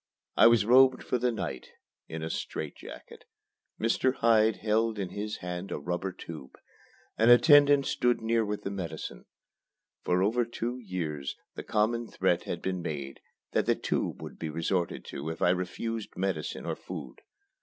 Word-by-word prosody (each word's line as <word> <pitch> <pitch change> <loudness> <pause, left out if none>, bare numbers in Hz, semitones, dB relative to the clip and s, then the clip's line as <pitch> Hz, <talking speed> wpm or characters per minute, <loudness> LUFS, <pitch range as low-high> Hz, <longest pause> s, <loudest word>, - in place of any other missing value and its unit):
I - - +8
was 115 -3 +5
robed 130 +2 +6
for 125 - -1
the 125 +1 +1
night 85 - -5 0.4
in 80 0 -6
a 80 - -3
strait - - -4
jacket. - - -11 0.6
Mr. 120 +3 +1
Hyde 110 -2 +4
held 110 +1 0
in 95 -3 -3
his 105 +2 -4
hand 90 +2 -5
a - - -2
rubber 90 +2 -3
tube. 80 -6 -10 0.6
An 115 +2 +5
attendant 145 +2 +7
stood 120 0 +1
near 115 0 +1
with 105 -1 -4
the 100 - -3
medicine. 85 -5 -6 0.8
For 90 +1 +2
over 115 +5 +2
two 120 +1 -4
years, 80 - -4 0.2
the - - -6
common 115 +2 0
threat 90 -4 0
had 85 - -4
been 95 -1 -2
made 70 -5 -5 0.3
that - - +1
the - - +4
"tube" - - -2
would - - -9
be 80 - -3
resorted 85 +3 -1
to 70 +4 -5
if 80 - -5
I 90 - +4
refused 105 +5 -3
medicine 95 +1 -2
or - - -2
food. - - -8
105 Hz, 165 wpm, -29 LUFS, 90-115 Hz, 0.8 s, I